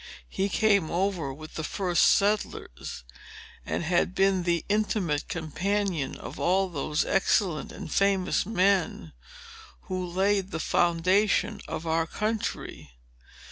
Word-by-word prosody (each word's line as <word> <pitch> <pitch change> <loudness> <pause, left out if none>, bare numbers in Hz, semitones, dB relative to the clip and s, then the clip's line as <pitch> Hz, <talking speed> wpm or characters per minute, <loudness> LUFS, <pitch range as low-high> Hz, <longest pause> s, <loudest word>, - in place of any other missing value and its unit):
"He 195 +1 -1
came 200 -6 +2
over 175 -5 -1
with 155 +3 -10
the 160 - -4
first 180 0 +1
settlers, 200 - 0 0.6
and - - -2
had 175 +2 +1
been 195 -1 +3
the 170 -1 0
intimate 200 -7 0
companion 175 -1 -2
of - - -9
all 190 +2 +2
those 150 -1 -1
excellent 190 -4 +1
and - - -8
famous 195 -2 +2
men 185 - +1 0.7
who 185 -1 -4
laid 190 +2 0
the 160 - -4
foundation 180 +6 +2
of 160 - -5
our 165 0 +1
country. 215 - -4
185 Hz, 120 wpm, -27 LUFS, 165-200 Hz, 0.7 s, been